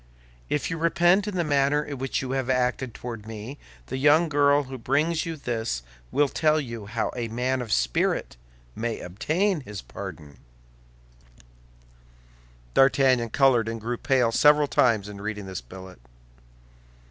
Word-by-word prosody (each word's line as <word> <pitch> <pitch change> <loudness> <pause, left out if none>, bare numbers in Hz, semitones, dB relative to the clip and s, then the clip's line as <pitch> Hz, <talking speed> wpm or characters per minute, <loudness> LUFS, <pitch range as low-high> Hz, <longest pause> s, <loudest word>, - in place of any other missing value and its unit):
If 150 +3 -1
you 165 - -3
repent 175 +4 +3
of 205 - -3
the 175 - +1
manner 145 -1 +2
in 145 -3 -7
which 135 0 -2
you 130 - -4
have 135 -1 -2
acted 125 -1 0
toward 115 -3 -7
me, 115 +5 -8 0.3
the - - -5
young 150 +5 +4
girl 145 0 +3
who 130 -1 -8
brings 155 +7 0
you 165 - -3
this 115 - -3 0.3
will 145 0 +3
tell 155 +2 +2
you 115 -7 -6
how 115 +1 -2
a 120 -2 -3
man 125 +3 -1
of 115 -3 -6
spirit - - 0 0.4
may 115 0 -3
obtain 160 - -1
his 105 -7 -8
pardon. 70 -3 -9 2.3
D'Artagnan 130 -3 +4
colored 125 -3 +3
and 115 0 -4
grew 120 +2 -3
pale 125 -3 +2
several 150 +4 +5
times 115 -7 +2
in 100 -1 -9
reading 105 -1 -4
this 95 -6 -6
billet. 95 +6 -12
130 Hz, 150 wpm, -25 LUFS, 110-145 Hz, 2.3 s, several